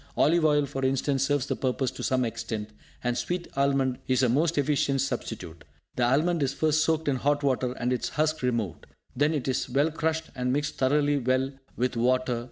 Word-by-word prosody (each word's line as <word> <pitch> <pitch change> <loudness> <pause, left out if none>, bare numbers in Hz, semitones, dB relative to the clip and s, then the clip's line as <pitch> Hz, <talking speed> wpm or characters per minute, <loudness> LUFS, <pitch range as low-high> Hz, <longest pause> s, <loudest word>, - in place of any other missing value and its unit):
Olive 170 +2 +4
oil, 145 -1 +3
for 135 -1 -5
instance 135 +1 +1
serves 145 -3 +1
this - - -3
purpose 130 -1 0
to - - -9
some 130 -1 +1
extent; 110 -2 -4 0.3
and 120 -1 0
sweet 175 +8 -2
almond 135 -2 +1
is 130 0 +2
a 125 - +4
most 155 +6 +1
efficient 140 -1 +1
substitute. 85 -10 -4 0.3
The 125 - 0
almond 155 +7 +2
is 135 0 0
first 155 +1 +2
soaked 160 -1 0
in 140 -2 +2
hot 145 +2 +1
water, 130 -2 +1
and 125 0 -1
its 125 - -2
husk 155 +1 0
removed. 115 - -2 0.3
Then 145 +4 +2
it 145 -5 -2
is 130 0 -1
well 140 +5 +2
crushed, 160 0 -2
and 125 0 -1
mixed 145 +2 -1
thoroughly 145 +2 +2
well 130 +1 +1 0.3
with 125 +1 0
water. 125 0 +1
135 Hz, 195 wpm, -27 LUFS, 125-145 Hz, 0.3 s, Olive